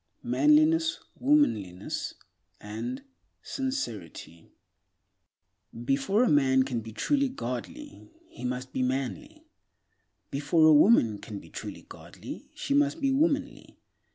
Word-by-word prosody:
Manliness, 310 +2 +3 0.2
Womanliness 110 - 0 0.4
and 245 - -6 0.4
Sincerity 110 - -5 1.4
BEFORE 140 - +2
A - - +3
MAN 130 -4 +4
CAN 125 -3 -3
BE 110 0 -9
TRULY 280 - +1
GODLY, 260 - -7 0.2
he - - -12
must 125 +1 -4
be - - -1
manly; 130 -6 -3 0.9
before 145 +3 +2
a 155 - +7
woman 145 - +5
can 105 - -8
be - - -12
truly - - -8
godly, - - -11
she 280 - -2
must 290 +2 +2
be 275 -2 +1
womanly. 290 +1 -1
145 Hz, 110 wpm, -28 LUFS, -, 1.4 s, a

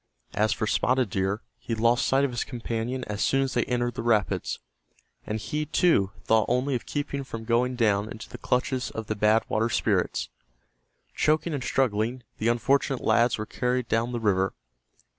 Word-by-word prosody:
As 105 +1 +2
for - - -1
Spotted 125 0 +1
Deer, 95 +3 -1 0.2
he 115 - -3
lost 115 +2 +2
sight 135 +1 +3
of 135 - -2
his 120 - -1
companion 120 +1 -3
as 105 -2 -4
soon 135 0 +2
as 135 - -2
they - - +1
entered 120 -1 -1
the - - -4
rapids, 110 -7 +1 0.7
and 110 +1 -2
he, 150 +6 -3
too, 155 - +3
thought 110 -1 +3
only 125 +3 +1
of 120 - -3
keeping 145 -1 -3
from 115 -4 -7
going 120 +2 +1
down 105 -3 +2
into 110 - -8
the - - -10
clutches 125 +1 0
of 110 - -6
the 110 - -2
Bad 105 +2 +3
Water 115 +2 +1
Spirits. - - 0 0.8
Gasping, - - -39
choking 155 +2 +1
and 140 -4 -2
struggling, 120 -1 0 0.2
the 110 - 0
unfortunate 135 +3 +2
lads 115 +2 +3
were 110 - -3
carried 125 +1 -1
down 115 +2 0
the 120 - -2
river. 95 -4 +1
120 Hz, 185 wpm, -26 LUFS, 110-130 Hz, 0.8 s, sight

